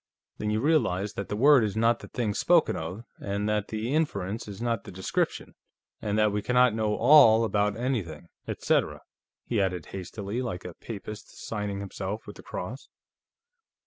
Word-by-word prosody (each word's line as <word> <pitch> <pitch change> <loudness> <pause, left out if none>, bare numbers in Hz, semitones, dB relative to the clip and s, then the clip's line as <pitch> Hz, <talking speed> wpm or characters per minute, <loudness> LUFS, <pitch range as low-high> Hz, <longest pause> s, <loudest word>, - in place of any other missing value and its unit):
"Then 105 - -1
you 110 +1 0
realize 110 - +1
that 100 - -5
the 105 - -2
word 135 +2 +6
is 105 0 -2
not 115 +1 +3
the - - -10
thing 110 -4 -2
spoken 170 - +3
of, 90 +8 -5 0.2
and 100 +1 -2
that 105 -1 0
the 110 +4 -3
inference 115 - -1
is 100 -1 -8
not 115 -3 -1
the - - -10
description, 95 0 -2 0.5
and 105 0 -1
that 105 -1 +4
we 105 +1 -1
cannot 125 +1 +4
know 110 -1 0
'all' 115 -4 +7
about 105 -1 +1
anything. 105 - -3 0.2
Etcetera," - - 0 0.4
he 115 -4 0
added 90 -4 -1
hastily, 100 +4 -4
like 110 -8 -4
a 90 - -6
Papist 105 +2 -9
signing 105 -2 -3
himself 100 +2 -5
with 105 - -9
the - - -10
Cross. 115 +10 -7
105 Hz, 175 wpm, -27 LUFS, 100-115 Hz, 0.5 s, all